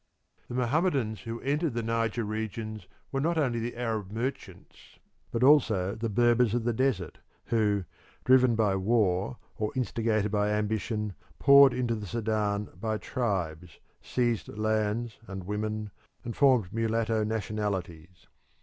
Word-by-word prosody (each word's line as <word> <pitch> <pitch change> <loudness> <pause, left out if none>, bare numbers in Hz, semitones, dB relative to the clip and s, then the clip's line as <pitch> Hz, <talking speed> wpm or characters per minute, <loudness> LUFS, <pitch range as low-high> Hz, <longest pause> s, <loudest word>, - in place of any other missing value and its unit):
The 120 - -6
Mohammedans 130 - +1
who 115 0 -5
entered 145 0 0
the 120 - -1
Niger 115 +1 0
regions 110 -1 -5 0.2
were 135 - -1
not 165 +3 +1
only 125 -6 +1
the 120 +1 -4
Arab 110 -5 -2
merchants 115 -4 -6 0.3
but 115 - -1
also 110 -10 +4
the 115 +1 -3
Berbers 120 +1 +3
of 120 - 0
the 120 0 0
desert, 110 -8 -1 0.3
who, 105 -4 +1 0.4
driven 130 -2 +5
by 105 -3 +2
war 100 +1 +1 0.2
or 105 0 -1
instigated 110 -3 0
by 105 -1 +1
ambition, 105 0 -1 0.2
poured 140 -1 +7
into 120 -2 0
the 105 -2 -5
Sudan 105 -1 -1
by 110 -1 -1
tribes, 90 - -3 0.2
seized 120 -3 -1
lands 110 +1 -1
and 95 -1 -6
women, 105 +1 -3 0.3
and 115 - -5
formed 125 -10 +3
mulatto 115 0 0
nationalities. 100 -6 -4
110 Hz, 135 wpm, -28 LUFS, 105-120 Hz, 0.4 s, poured